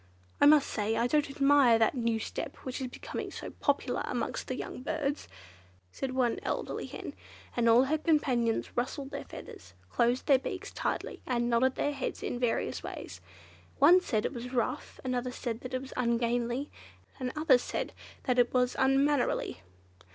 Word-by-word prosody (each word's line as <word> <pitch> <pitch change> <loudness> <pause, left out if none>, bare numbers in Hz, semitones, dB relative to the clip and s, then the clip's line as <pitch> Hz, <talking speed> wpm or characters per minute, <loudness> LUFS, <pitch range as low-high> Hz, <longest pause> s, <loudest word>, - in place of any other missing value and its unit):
"I 285 - +8
must 295 -1 +6
say 215 0 -1
I 235 - +2
don't 295 +3 +2
admire 275 -4 +5
that 225 -1 +3
new 230 -3 0
step 220 - -5
which 255 0 -4
is 260 - -2
becoming 250 - -6
so - - -7
popular - - 0
amongst - - -3
the - - -2
young - - -6
birds," 295 0 -2 0.6
said 260 - -4
one 245 -3 +1
elderly - - -3
hen; - - -7 0.4
and 235 -1 +3
all 235 +3 +7
her 305 +4 0
companions 255 -8 +1
rustled 270 +3 -2
their 280 - -5
feathers, 95 -3 -11 0.2
closed 240 - +2
their 275 -2 +5
beaks - - -5
tightly, - - -3
and 240 -1 0
nodded 255 +3 +3
their 290 - 0
heads 270 -2 -4
in 245 - -2
various 245 -2 0
ways. - - -7 0.6
One 340 +6 +7
said 220 -11 -1
it - - -2
was 245 0 -6
"rough," 240 -3 -2
another 250 -1 -1
that 250 0 -5
it - - 0
was 265 - -9
"ungainly," 240 +2 0 0.5
and 255 -1 -2
others 290 -5 +3
that 250 -1 -3
it 240 0 +4
was 250 0 +2
"unmannerly." 270 +1 +2
255 Hz, 165 wpm, -30 LUFS, 240-275 Hz, 0.6 s, I